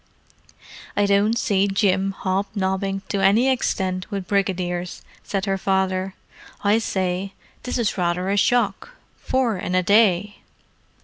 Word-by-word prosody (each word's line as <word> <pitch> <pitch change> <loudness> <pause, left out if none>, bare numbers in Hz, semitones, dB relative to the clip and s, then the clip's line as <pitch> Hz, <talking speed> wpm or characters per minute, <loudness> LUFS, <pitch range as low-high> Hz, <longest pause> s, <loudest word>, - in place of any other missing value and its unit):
"I 205 - +4
don't 200 +3 +2
see 200 -4 +1
Jim 195 -1 +1
hob 190 +1 -1
nobbing 195 0 -1
to 200 - -1
any 220 +7 +4
extent 185 -7 -1
with 195 -3 -4
brigadiers," 180 -3 -2 0.2
said 195 -1 -2
her 195 -1 -1
father. 190 0 0 0.5
"I 210 +2 +3
say, 190 -2 -2 0.3
this 250 - -3
is 225 -5 -1
rather 180 +1 0
a - - +1
shock. 235 - +1 0.2
Four 245 -7 -1
in 180 0 -2
a 185 - +3
day!" 205 0 +3
195 Hz, 135 wpm, -22 LUFS, 185-205 Hz, 0.5 s, I